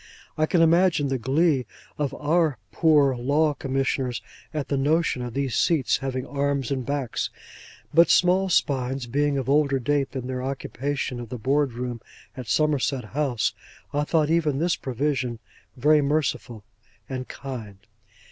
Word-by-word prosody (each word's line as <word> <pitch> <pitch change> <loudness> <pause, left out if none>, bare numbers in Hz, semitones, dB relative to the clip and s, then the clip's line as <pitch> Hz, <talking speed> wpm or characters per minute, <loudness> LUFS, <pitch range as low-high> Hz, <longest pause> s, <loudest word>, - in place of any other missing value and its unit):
I 155 0 +1
can 165 0 +3
imagine 165 -3 +3
the 135 -1 -1
glee 135 +1 +2 0.3
of 145 -3 0
our 155 -1 +1
Poor 150 -5 +4
Law 145 +5 +2
Commissioners 135 -2 -1 0.3
at 150 -2 -3
the 140 - -1
notion 145 0 +1
of 120 -1 -6
these 135 -3 -1
seats 155 -7 +2
having 130 -1 -3
arms 140 -2 -1
and 130 -2 -1
backs; 140 -2 -2 0.6
but 165 +1 +6
small 185 +1 +4
spines 130 -5 0
being 145 +3 0
of 130 - -2
older 140 -1 +3
date 140 +2 0
than 130 -3 -4
their 130 0 -3
occupation 135 0 -3
of 120 -2 -7
the 125 - -5
Board 135 +3 +1
room 120 -1 -5 0.3
at 125 -3 -7
Somerset 140 0 +1
House, 135 -6 0 0.4
I 145 +1 +1
thought 155 0 +1
even 155 -4 +2
this 170 +3 +1
provision 130 -2 -2 0.4
very 150 +4 +4
merciful 140 -6 -1 0.4
and 130 -1 -5
kind. 115 -8 -7
140 Hz, 150 wpm, -25 LUFS, 130-150 Hz, 0.6 s, but